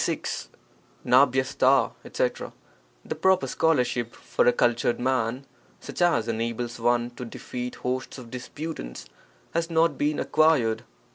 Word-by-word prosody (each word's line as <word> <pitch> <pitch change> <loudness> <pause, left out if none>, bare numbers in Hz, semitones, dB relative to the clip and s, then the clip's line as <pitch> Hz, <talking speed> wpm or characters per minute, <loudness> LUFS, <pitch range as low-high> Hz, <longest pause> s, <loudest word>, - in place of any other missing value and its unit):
— - - -33
The 130 +1 +4 1.3
proper 190 -1 +3
scholarship 125 -6 +1
for - - 0
a - - +8
cultured 120 0 +1
man, 130 0 0 0.3
such - - -7
as 170 -10 +3
enables 115 +1 -3
one 120 +1 +1
to 125 - -8
defeat 125 +1 -6
hosts 130 +2 -3
of 120 -3 -11
disputants, 125 - -6 0.5
has 165 0 0
not 165 0 +2
been 150 +1 +1
acquired. 150 -8 +2
125 Hz, 115 wpm, -26 LUFS, 120-145 Hz, 1.3 s, a